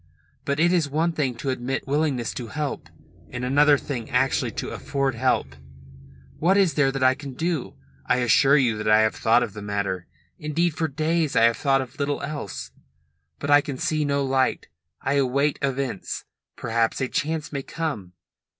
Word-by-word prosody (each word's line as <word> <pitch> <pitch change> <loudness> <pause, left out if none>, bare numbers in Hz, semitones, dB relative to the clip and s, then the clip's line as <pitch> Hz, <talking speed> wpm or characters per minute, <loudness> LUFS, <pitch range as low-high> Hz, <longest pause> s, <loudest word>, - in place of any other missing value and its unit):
But 140 +1 -1
it 175 +2 +4
is 165 -5 +2
one 160 +4 +1
thing 140 -6 -1
to 130 +3 -2
admit 130 +1 -3
willingness 140 -5 0
to 120 - -6
help 150 +4 -4 0.4
and 125 0 -4
another 145 +3 +5
thing 130 -5 -5
actually - - +1
to - - -4
afford 140 -2 -1
help. 115 - 0 0.8
What 185 +5 +3
is 190 -5 +3
there 140 -2 +3
that 135 -1 -2
I 130 0 +6
can 135 -1 -9
do? 165 -2 -2 0.3
I - - +3
assure 135 +4 +5
you 120 -6 +2
that 105 - -3
I 105 0 +6
have 110 0 +2
thought 115 +2 +3
of 110 -5 -5
the 105 - -8
matter. 100 -3 -3 0.3
Indeed 160 +3 0
for 160 +1 -1
days 155 +1 0
I - - +5
have 115 0 +4
thought 135 -2 +2
of 130 +1 -9
little 140 0 -1
else. 140 -9 -5 0.7
But 145 - -3
I 145 0 +7
can 140 -2 -5
see 155 +3 0
no 140 -1 0
light. 130 -1 0 0.3
I 135 +2 +1
await 140 +3 +1
events. 135 -6 -3 0.3
Perhaps 115 0 0
a 130 - 0
chance 155 +3 -2
may 140 - -2
come." 135 - -4
135 Hz, 185 wpm, -24 LUFS, 120-150 Hz, 0.8 s, I